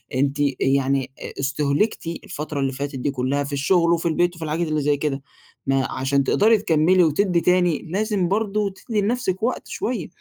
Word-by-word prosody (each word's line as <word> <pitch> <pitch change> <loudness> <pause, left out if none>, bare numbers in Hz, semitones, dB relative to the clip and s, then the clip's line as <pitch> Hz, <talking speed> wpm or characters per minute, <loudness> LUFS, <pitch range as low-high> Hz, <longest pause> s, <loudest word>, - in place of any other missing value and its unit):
أنتِ 140 +2 0
آآ، 145 - +3
يعني 135 -1 +1 0.3
استهلكتِ 145 +7 0 0.2
الفترة 150 -1 -5
اللي 135 -1 0
فاتت 140 +1 -5
دي 135 +2 -1
كلّها 135 +2 -1
في 140 +1 -6
الشغل 170 +4 +2
وفي 170 0 0
البيت 175 +2 +1
وفي 165 - -6
الحاجات 160 +2 -1
اللي 155 -1 0
زي 145 0 +2
كده 140 -2 -2 0.4
ما 135 -1 +1
علشان 135 +1 0
تقدري 220 +10 +4
تكملي 180 -2 +3
وتدي 170 +2 +2
تاني، 180 -3 +2
لازم 200 0 0
برضو 210 +1 0
تدي 210 +2 -3
لنفسِك 205 -3 -1
وقت 245 +2 -1
شوية 225 -9 -3
160 Hz, 175 wpm, -22 LUFS, 140-190 Hz, 0.4 s, تقدري